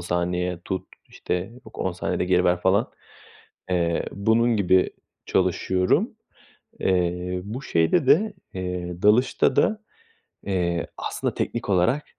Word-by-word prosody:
saniye 90 0 -1
tut, 95 - -3 0.2
işte, - - -4 0.3
yok - - -12
10 95 - -1
saniyede 90 0 -2
geri 90 0 +2
ver 90 0 +2
falan, 95 +4 +2 0.8
eee, 85 -2 +1
bunun 115 +3 +2
gibi 95 -2 +3 0.4
çalışıyorum. 95 0 +1 0.6
Eee, 90 0 0
bu 115 +7 -6
şeyde 105 - +2
de, 200 +10 +4 0.2
eee, 90 -1 -4
dalışta 125 +5 +4
da, 220 0 +2 0.6
eee, 85 -3 -1
aslında - - -3
teknik 120 -2 -3
olarak 100 +10 +2
90 Hz, 120 wpm, -24 LUFS, 90-105 Hz, 0.8 s, de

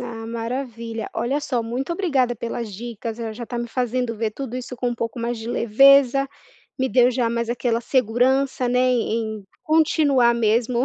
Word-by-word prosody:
Ah, 230 -2 -6
maravilha! 230 -1 -4
Olha 270 +5 -1
só, 255 -5 -1
muito 250 +7 -3
obrigada 275 -10 0
pelas 230 -1 -5
dicas, 230 +1 -6
eh, 225 -2 -4
já 235 +2 -7
tá 240 +1 -5
me 235 - -3
fazendo 245 -1 -1
ver 220 0 -1
tudo 250 +2 -6
isso 250 0 -6
com 245 - -1
um - - -2
pouco 230 +1 -4
mais 235 +1 -2
de 225 +1 -7
leveza, 275 +4 +5 0.5
me 260 0 +1
deu 250 -1 +4
já 245 -2 0
mais 235 0 -2
aquela 235 -1 0
segurança, 255 +2 +1
né 250 +1 +1
em 230 -3 0
em 200 - -15 0.2
continuar 300 -6 +3
mesmo 235 +2 +1
240 Hz, 185 wpm, -22 LUFS, 230-255 Hz, 0.5 s, leveza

